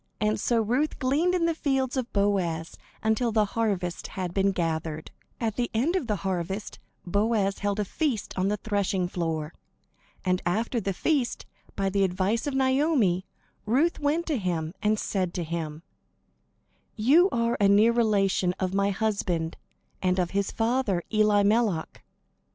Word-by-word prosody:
And 215 Hz, 0 st, +1 dB
so 230 Hz, -2 st, +1 dB
Ruth 255 Hz, +8 st, 0 dB
gleaned 305 Hz, +8 st, +1 dB
in 345 Hz, -2 st, +1 dB
the 335 Hz, -, +2 dB
fields 270 Hz, -4 st, 0 dB
of 255 Hz, -2 st, -2 dB
Boaz 185 Hz, -5 st, 0 dB, 0.3 s
until 220 Hz, +2 st, +1 dB
the 215 Hz, -1 st, +3 dB
harvest 195 Hz, -6 st, -1 dB
had 180 Hz, -2 st, -5 dB
been 195 Hz, 0 st, +2 dB
gathered. 160 Hz, -3 st, -3 dB, 0.3 s
At 225 Hz, -3 st, -2 dB
the 240 Hz, -1 st, 0 dB
end 285 Hz, +11 st, +1 dB
of 315 Hz, -10 st, -1 dB
the 210 Hz, -, +1 dB
harvest, 190 Hz, +2 st, -3 dB, 0.3 s
Boaz 200 Hz, +1 st, +1 dB
held 205 Hz, 0 st, -1 dB
a 210 Hz, -, 0 dB
feast 260 Hz, -, -2 dB
on 185 Hz, 0 st, +1 dB
the 210 Hz, +1 st, 0 dB
threshing 200 Hz, -3 st, -1 dB
floor. 165 Hz, -3 st, -3 dB, 0.7 s
And 180 Hz, 0 st, +1 dB
after 225 Hz, +7 st, 0 dB
the 195 Hz, -, -1 dB
feast, 260 Hz, -, -1 dB, 0.3 s
by 195 Hz, -1 st, 0 dB
the 200 Hz, 0 st, +2 dB
advice 190 Hz, +7 st, 0 dB
of 280 Hz, -, -2 dB
Naomi, 260 Hz, -, +2 dB, 0.4 s
Ruth 285 Hz, +10 st, +2 dB
went 305 Hz, +3 st, 0 dB
to 300 Hz, -7 st, -1 dB
him, 170 Hz, -4 st, -2 dB
and 215 Hz, +1 st, +2 dB
said 185 Hz, -4 st, -2 dB
to 175 Hz, -, -1 dB
him: 160 Hz, -1 st, -5 dB, 1.1 s
"You 290 Hz, -, +5 dB
are 235 Hz, -6 st, 0 dB
a 200 Hz, -, +5 dB
near 210 Hz, +3 st, +5 dB
relation 200 Hz, -6 st, +2 dB
of 185 Hz, -1 st, -1 dB
my 200 Hz, 0 st, +2 dB
husband 195 Hz, -6 st, -1 dB, 0.5 s
and 185 Hz, 0 st, +1 dB
of 180 Hz, -2 st, 0 dB
his 200 Hz, 0 st, 0 dB
father, 225 Hz, -6 st, 0 dB
Elimelech. 210 Hz, -3 st, +2 dB
205 Hz, 155 wpm, -27 LUFS, 185-235 Hz, 1.1 s, You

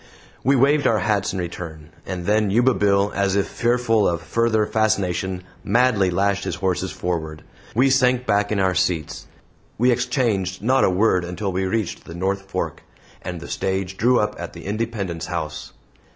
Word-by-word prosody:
We 135 Hz, +2 st, +4 dB
waved 140 Hz, +3 st, +3 dB
our 110 Hz, -, +3 dB
hats 105 Hz, 0 st, 0 dB
in -, -, -4 dB
return. 80 Hz, -3 st, -6 dB, 0.2 s
And 90 Hz, -2 st, -4 dB
then 105 Hz, +1 st, +2 dB
Yuba 120 Hz, +6 st, +4 dB
Bill, 100 Hz, -1 st, +2 dB
as 100 Hz, -1 st, +1 dB
if 100 Hz, -, +2 dB
fearful 120 Hz, -3 st, +1 dB
of 85 Hz, -1 st, -1 dB
further 115 Hz, -2 st, +1 dB
fascination, 95 Hz, -4 st, 0 dB, 0.2 s
madly 110 Hz, -3 st, +3 dB
lashed 100 Hz, +2 st, +1 dB
his -, -, -3 dB
horses 95 Hz, -1 st, -1 dB
forward, 80 Hz, -4 st, -4 dB
and -, -, -24 dB
we 130 Hz, +3 st, +4 dB
sank 125 Hz, -1 st, +3 dB
back 100 Hz, -1 st, +1 dB
in 105 Hz, -, +1 dB
our 95 Hz, -1 st, +2 dB
seats. 85 Hz, -4 st, -1 dB, 0.5 s
We 125 Hz, +3 st, +4 dB
exchanged 115 Hz, -7 st, 0 dB
not 130 Hz, +3 st, +3 dB
a -, -, +4 dB
word 95 Hz, -1 st, +2 dB
until 90 Hz, +3 st, -3 dB
we 95 Hz, +1 st, -1 dB
reached 105 Hz, -1 st, -2 dB
the 80 Hz, -, -9 dB
North 95 Hz, +2 st, -2 dB
Fork, -, -, -3 dB, 0.4 s
and 90 Hz, -1 st, -5 dB
the 85 Hz, -, -9 dB
stage 95 Hz, 0 st, -2 dB
drew 120 Hz, +4 st, +3 dB
up 105 Hz, -, 0 dB
at -, -, -6 dB
the -, -, -10 dB
Independence 100 Hz, -5 st, -3 dB
House. 80 Hz, -4 st, -5 dB
100 Hz, 180 wpm, -22 LUFS, 90-115 Hz, 0.5 s, We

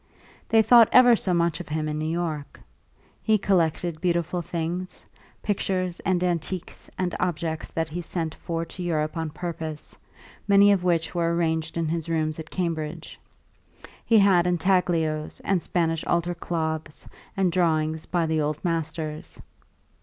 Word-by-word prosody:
They 225 Hz, -1 st, +5 dB
thought 235 Hz, -1 st, +7 dB
ever 245 Hz, -2 st, +7 dB
so 195 Hz, -, -1 dB
much 170 Hz, -1 st, +1 dB
of 175 Hz, -, -8 dB
him 155 Hz, 0 st, -2 dB
in 150 Hz, 0 st, -3 dB
New 155 Hz, 0 st, -2 dB
York. 160 Hz, -4 st, -3 dB, 0.6 s
He 220 Hz, -1 st, +3 dB
collected 170 Hz, -4 st, 0 dB
beautiful 175 Hz, 0 st, 0 dB
things, 170 Hz, +2 st, -4 dB, 0.4 s
pictures 185 Hz, -3 st, -1 dB
and 180 Hz, -2 st, 0 dB
antiques 175 Hz, 0 st, -3 dB
and 180 Hz, -2 st, -1 dB
objects 165 Hz, -2 st, -2 dB
that 165 Hz, -1 st, -2 dB
he 175 Hz, +3 st, -4 dB
sent 165 Hz, -2 st, -3 dB
for 165 Hz, -1 st, -4 dB
to 180 Hz, -, -9 dB
Europe 155 Hz, -3 st, -1 dB
on 160 Hz, -1 st, -2 dB
purpose, 160 Hz, -2 st, -6 dB, 0.5 s
many 200 Hz, 0 st, +6 dB
of 195 Hz, -3 st, +2 dB
which 170 Hz, -2 st, +1 dB
were 170 Hz, -1 st, +1 dB
arranged 160 Hz, -1 st, -1 dB
in 165 Hz, -1 st, 0 dB
his 165 Hz, 0 st, -3 dB
rooms 155 Hz, -1 st, -1 dB
at 160 Hz, 0 st, -8 dB
Cambridge. 165 Hz, -2 st, -4 dB, 0.8 s
He 225 Hz, -, +4 dB
had 190 Hz, -4 st, +5 dB
intaglios 170 Hz, -3 st, +1 dB
and 190 Hz, -3 st, +1 dB
Spanish 165 Hz, -1 st, 0 dB
altar 175 Hz, 0 st, 0 dB
cloths 160 Hz, -2 st, -4 dB, 0.3 s
and 190 Hz, -2 st, +2 dB
drawings 160 Hz, -2 st, 0 dB
by 170 Hz, -2 st, 0 dB
the 160 Hz, -1 st, 0 dB
old 150 Hz, 0 st, -1 dB
masters. 160 Hz, -2 st, -3 dB
170 Hz, 150 wpm, -25 LUFS, 160-180 Hz, 0.8 s, thought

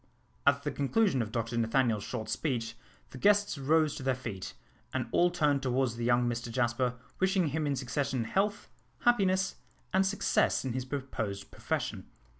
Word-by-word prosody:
At 140 Hz, 0 st, +4 dB
the 145 Hz, -, -1 dB
conclusion 145 Hz, -, +2 dB
of 110 Hz, -1 st, -4 dB
Dr 115 Hz, 0 st, -2 dB
Nathaniel's 115 Hz, -2 st, +2 dB
short 110 Hz, -, -4 dB
speech 120 Hz, -7 st, -2 dB, 0.4 s
the 130 Hz, -, -9 dB
guests 205 Hz, -4 st, +3 dB
rose 155 Hz, +2 st, +3 dB
to -, -, -6 dB
their 130 Hz, -1 st, +1 dB
feet, 110 Hz, -7 st, -6 dB, 0.4 s
and 130 Hz, -2 st, -1 dB
all 175 Hz, -, +4 dB
turned 150 Hz, -5 st, +1 dB
towards 130 Hz, -2 st, 0 dB
the 120 Hz, -, -4 dB
young 120 Hz, 0 st, +3 dB
Mr 120 Hz, 0 st, -3 dB
Jasper, 125 Hz, +1 st, 0 dB, 0.2 s
wishing 190 Hz, -3 st, +2 dB
him 155 Hz, +1 st, -1 dB
in 140 Hz, -, +1 dB
succession 130 Hz, 0 st, -1 dB
health, 200 Hz, -, 0 dB, 0.3 s
happiness, 190 Hz, -5 st, +2 dB, 0.4 s
and 190 Hz, +1 st, +4 dB
success 195 Hz, -7 st, +1 dB
in 130 Hz, -, -2 dB
his 130 Hz, 0 st, -3 dB
proposed 125 Hz, -7 st, -4 dB
profession. -, -, -3 dB
135 Hz, 165 wpm, -30 LUFS, 120-160 Hz, 0.4 s, At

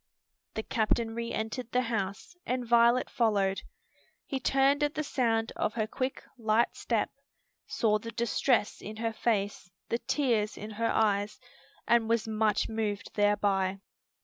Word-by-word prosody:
The 220 Hz, -, -2 dB
captain 225 Hz, 0 st, 0 dB
re 235 Hz, 0 st, -3 dB
entered 220 Hz, +2 st, -3 dB
the 250 Hz, 0 st, +2 dB
house 205 Hz, -, -3 dB
and 250 Hz, 0 st, -2 dB
Violet 235 Hz, +1 st, +4 dB
followed. 200 Hz, -4 st, +1 dB, 0.6 s
He 270 Hz, -, -3 dB
turned 275 Hz, +2 st, +3 dB
at 295 Hz, 0 st, +1 dB
the 305 Hz, -, -1 dB
sound 225 Hz, -5 st, 0 dB
of -, -, -1 dB
her 220 Hz, -2 st, +1 dB
quick, 255 Hz, +4 st, -3 dB, 0.2 s
light 225 Hz, +1 st, +2 dB
step, -, -, -1 dB, 0.6 s
saw 215 Hz, -2 st, +1 dB
the 230 Hz, -, -7 dB
distress 235 Hz, 0 st, +1 dB
in 215 Hz, +2 st, -7 dB
her 225 Hz, 0 st, -2 dB
face, 205 Hz, -5 st, -1 dB, 0.2 s
the 235 Hz, -, 0 dB
tears 230 Hz, -8 st, 0 dB
in 215 Hz, +1 st, -7 dB
her 230 Hz, +2 st, -1 dB
eyes, 205 Hz, 0 st, +1 dB, 0.5 s
and 235 Hz, -1 st, +3 dB
was 230 Hz, -1 st, +1 dB
much 215 Hz, -1 st, +1 dB
moved 215 Hz, -2 st, -3 dB
thereby. 200 Hz, -2 st, +2 dB
225 Hz, 145 wpm, -30 LUFS, 210-235 Hz, 0.6 s, Violet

